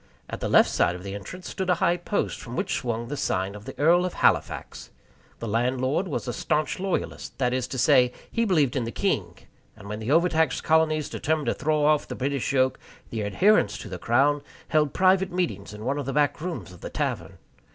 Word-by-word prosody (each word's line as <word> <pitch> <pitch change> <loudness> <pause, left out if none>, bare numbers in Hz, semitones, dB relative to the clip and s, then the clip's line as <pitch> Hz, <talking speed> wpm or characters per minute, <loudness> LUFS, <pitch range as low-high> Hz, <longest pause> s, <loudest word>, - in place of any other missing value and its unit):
At - - -6
the - - -2
left - - +5
side 90 - +2
of 90 - -9
the 100 0 -6
entrance 105 - -8
stood 190 -1 -3
a 180 - +4
high 170 +1 +2
post, 180 +4 -2
from 120 0 -8
which - - -1
swung 115 -1 -2
the 145 - -4
sign 95 -8 -1
of 105 0 -11
the - - -8
Earl 170 +4 +4
of 180 - -3
Halifax. - - 0 0.5
The 115 - -6
landlord 130 - 0
was 145 - -3
a 120 - -2
stanch 150 +7 -1
loyalist 190 -1 -3
that 125 -2 +1
is 130 -1 -1
to 130 - -5
say, 125 0 +4 0.2
he 230 - +1
believed 155 - +2
in 125 -4 0
the 115 - -4
king, - - -1 0.4
and 100 -2 -12
when 105 +1 -5
the 110 +2 -5
overtaxed 160 0 +2
colonies 155 -2 +2
determined 155 -1 -1
to - - +2
throw 150 -1 0
off 150 -1 +3
the - - -5
British 140 0 -1
yoke, 130 -1 +2 0.3
the 110 -2 -2
adherents 105 - +3
to 110 -1 -8
the 90 -1 -6
Crown 140 +7 +2 0.3
held 150 -3 +2
private 190 +2 +3
meetings 165 - -2
in 105 +1 -9
one 140 +3 0
of 140 - -5
the 135 - -2
back 150 0 +1
rooms 170 - -5
of 90 - -14
the - - -6
tavern. - - -3
140 Hz, 220 wpm, -25 LUFS, 115-160 Hz, 0.5 s, left